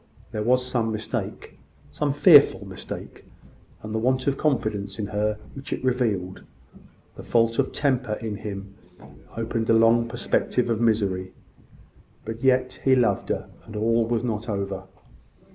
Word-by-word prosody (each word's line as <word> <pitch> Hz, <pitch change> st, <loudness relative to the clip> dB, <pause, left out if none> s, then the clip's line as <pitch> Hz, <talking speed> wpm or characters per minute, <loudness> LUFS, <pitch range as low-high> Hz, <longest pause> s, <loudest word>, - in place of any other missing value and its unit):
There 110 Hz, -2 st, -3 dB
was 125 Hz, +3 st, +2 dB
some 120 Hz, -3 st, 0 dB
mistake 110 Hz, 0 st, -5 dB, 0.3 s
some 145 Hz, -, -1 dB
fearful 145 Hz, -, +6 dB
mistake; 95 Hz, -1 st, -8 dB, 0.6 s
and 110 Hz, 0 st, -6 dB
the 110 Hz, -, 0 dB
want 130 Hz, +2 st, +1 dB
of 140 Hz, -, +1 dB
confidence 105 Hz, -9 st, -1 dB
in 105 Hz, -, -2 dB
her 105 Hz, +1 st, -1 dB, 0.2 s
which 135 Hz, 0 st, -9 dB
it -, -, -3 dB
revealed 110 Hz, -8 st, -1 dB, 0.7 s
the -, -, -9 dB
fault 115 Hz, 0 st, +1 dB
of 135 Hz, -, +1 dB
temper 130 Hz, -5 st, 0 dB
in 105 Hz, -1 st, -4 dB
him 100 Hz, -1 st, -7 dB, 0.6 s
opened 115 Hz, 0 st, -2 dB
a -, -, +6 dB
long 115 Hz, +1 st, +4 dB
perspective 120 Hz, +1 st, 0 dB
of 115 Hz, 0 st, 0 dB
misery; 100 Hz, -5 st, +1 dB, 0.9 s
but 115 Hz, +2 st, -6 dB
yet, 130 Hz, -1 st, +2 dB
he 135 Hz, -1 st, +5 dB
loved 125 Hz, -2 st, +1 dB
her, -, -, -2 dB, 0.2 s
and 110 Hz, -, -11 dB
all 115 Hz, +2 st, +2 dB
was 120 Hz, 0 st, 0 dB
not 115 Hz, -1 st, -3 dB
over. 100 Hz, -2 st, -3 dB
115 Hz, 150 wpm, -25 LUFS, 105-125 Hz, 0.9 s, fearful